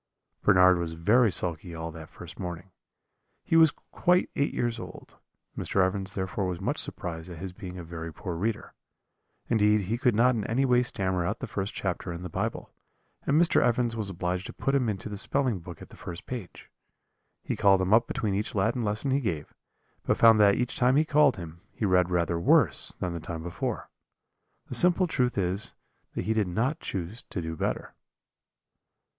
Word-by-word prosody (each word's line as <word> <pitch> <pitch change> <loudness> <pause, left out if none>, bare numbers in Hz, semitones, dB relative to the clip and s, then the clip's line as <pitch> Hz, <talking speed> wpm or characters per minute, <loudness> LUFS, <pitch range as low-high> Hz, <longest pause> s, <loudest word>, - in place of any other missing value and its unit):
"Bernard 90 -2 +5
was 85 -1 -3
very 105 +8 +3
sulky 85 -1 -2
all 80 0 -5
that 80 -1 -10
first 85 -2 -11
morning. 90 0 -6 0.7
He - - 0
was 160 -1 +7 0.2
quite 180 +1 +2
eight 140 - +1
years 120 -1 -1
old; - - -11 0.4
Mr. 95 -1 +1
Evans 95 +1 -2
therefore 95 0 -2
was 90 -2 -3
much - - -1
surprised 80 0 -3
at 85 - -8
his 95 +2 -6
being 90 -2 -8
a 90 - -6
very 80 0 -7
poor 85 +3 -6
reader. 105 +5 -3 0.7
Indeed 105 -2 +3
he 110 +5 -2
could 125 -4 +2
not 125 +3 +4
in 110 -3 -2
any 130 +4 +1
way 125 -1 +4
stammer 95 -7 -1
out 85 - -2
the - - -5
first 100 +1 -4
chapter 90 -1 -3
in 85 +1 -6
the 90 - -5
Bible, - - -3 0.5
and 145 +3 +4
Mr. 170 - +4
Evans 120 -1 +1
was 110 -3 -2
obliged 90 0 -3
to - - -8
put 135 - -1
him 130 -5 +2
into 100 0 -4
the 105 -1 -5
spelling 125 -1 0
book 85 -1 -10
at - - -14
the - - -14
first 85 0 -8
page. 120 -8 -8 0.7
He - - -2
called 95 -1 +4
him 95 +2 +1
up 115 +1 +5
between 105 -3 -2
each 105 +2 -2
Latin 115 +5 +1
lesson 105 +6 -1
he 135 - +3
gave, 80 - -3 0.5
but - - 0
found 115 -1 +7
that 100 -1 +6
each 125 0 -1
time 125 +1 +3
he 155 +2 +4
called 150 -5 +4
him, 85 -1 -9
he 110 - -2
read 90 -2 +3
rather 85 -1 0
worse 85 - +4
than 90 -2 -2
the 85 - -4
time 80 0 -6
before. 85 0 -4 0.7
The - - -8
simple 180 +1 +5
truth 125 -9 0
is 95 +2 -2 0.4
that - - -3
he 110 - +1
did 110 -3 +1
not 115 - -1
choose 95 +5 -5
to - - -3
do 80 -1 -4
better. - - -3
100 Hz, 195 wpm, -28 LUFS, 90-120 Hz, 0.7 s, was